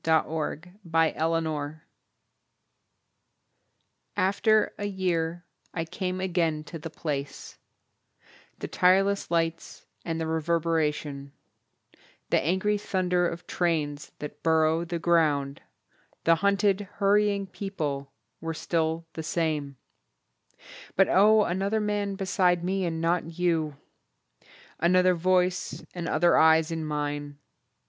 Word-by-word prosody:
IN 160 - 0
A 160 - +5
SUBWAY 160 +2 -4 0.4
STATION 155 -2 -2 2.4
AFTER 205 +3 +2
a 205 - -2
year 175 -3 -1 0.3
I 165 -1 -1
came 185 +2 -3
again 170 -4 0
to 165 +1 -8
the 165 - -6
place; 145 -3 -5 1.0
The - - -5
tireless 195 +2 +3
lights 165 -1 -2 0.2
and 165 -1 -3
the 160 - -1
reverberation, 155 -3 -1 1.0
The - - +4
angry 190 +7 +1
thunder 180 -3 +1
of 170 +1 -8
trains 150 -4 -1
that 150 0 -8
burrow 160 +1 +2
the 170 0 -3
ground, 150 -5 +1 0.6
The 165 0 +4
hunted, 200 +1 +2
hurrying 200 0 +2
people 155 -8 -4 0.3
were 165 0 -4
still 165 0 -1
the 160 - -5
same 155 -4 -2 1.2
But 195 - +4
oh, 210 +3 +6
another 195 +4 0
man 205 -1 -1
beside 185 -3 +1
me 190 +1 0
and 165 -1 -2
not 165 0 -1
you! 165 -5 0 1.0
Another 180 +2 +4
voice 180 +1 0
and 175 -2 -4
other 170 +2 +4
eyes 160 0 +5
in 160 -1 -3
mine! 145 -1 -3
165 Hz, 110 wpm, -27 LUFS, 160-185 Hz, 2.4 s, oh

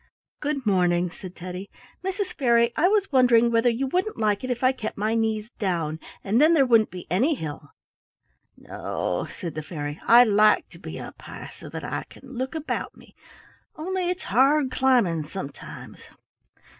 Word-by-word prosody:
"Good 285 -3 -2
morning," 180 -3 +2
said 180 0 -10
Teddy. 180 +2 -7 0.3
"Mrs. 385 +1 -2
Fairy, 235 -3 +3
I 350 - +4
was 400 -2 +1
wondering 240 -3 +5
whether 230 +1 +3
you 240 +3 -1
wouldn't 365 +10 -1
like 210 -1 +1
it 255 - -3
if 245 0 -2
I 255 - +5
kept 245 -5 -6
my 215 +2 0
knees 220 0 -1
down, 165 -6 -1 0.2
and 215 +6 +2
then 320 +2 +6
there 275 -4 +5
wouldn't 230 -3 +4
be 180 -1 -8
any 260 - +2
hill." 150 - -7 0.9
"No," - - -3
said 170 -3 -5
the 155 - -4
fairy, 150 -2 -6
"I 240 +1 +9
like 215 -1 +4
to - - -15
be - - -7
up - - -10
high - - -9
so - - -11
that - - -7
I - - -4
can 265 0 -14
look 260 +4 -4
about 315 -1 -4
me, - - -18 0.6
only 360 +3 -2
it's 360 +1 -3
hard 270 +5 +3
climbing 235 - +2
sometimes. 155 -5 -8
235 Hz, 175 wpm, -25 LUFS, 185-270 Hz, 0.9 s, I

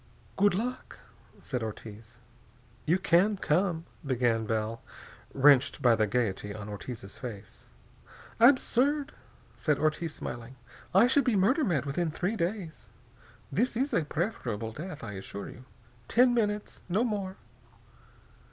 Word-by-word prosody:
"Good 200 -1 +3
luck," 245 +5 -4 0.5
said 125 -3 -3
Ortiz. 110 0 -8 0.7
"You 170 +4 +4
can 190 +3 +3
come 170 -1 0
" - - -30
began 115 -3 +1
Bell, 110 +1 -2 0.5
wrenched 140 -1 +5
by 120 -2 +5
the 110 -1 +1
gaiety 105 -3 -1
on 105 -1 -7
Ortiz's 105 -1 -8
face. 105 -5 -9 0.7
"Absurd," 275 +3 +4 0.4
said 150 -4 +1
Ortiz, 155 +2 -1
smiling. 120 +2 -7 0.4
"I 195 +5 +6
should 265 +3 +3
be 245 -4 +2
murder 230 - +3
mad 165 - +1
within 160 +4 -1
three 180 +7 -2
days. 175 -3 -4 0.6
This 225 - 0
is 270 +3 0
a - - +2
preferable 125 - -3
death, 155 +4 -7
I 110 - -5
assure 100 +1 -7
you. 125 - -12 0.4
Ten 245 +1 +4
minutes, 210 -3 -1
no 200 +7 +2
more!" 200 -5 -2
160 Hz, 135 wpm, -29 LUFS, -, 0.7 s, I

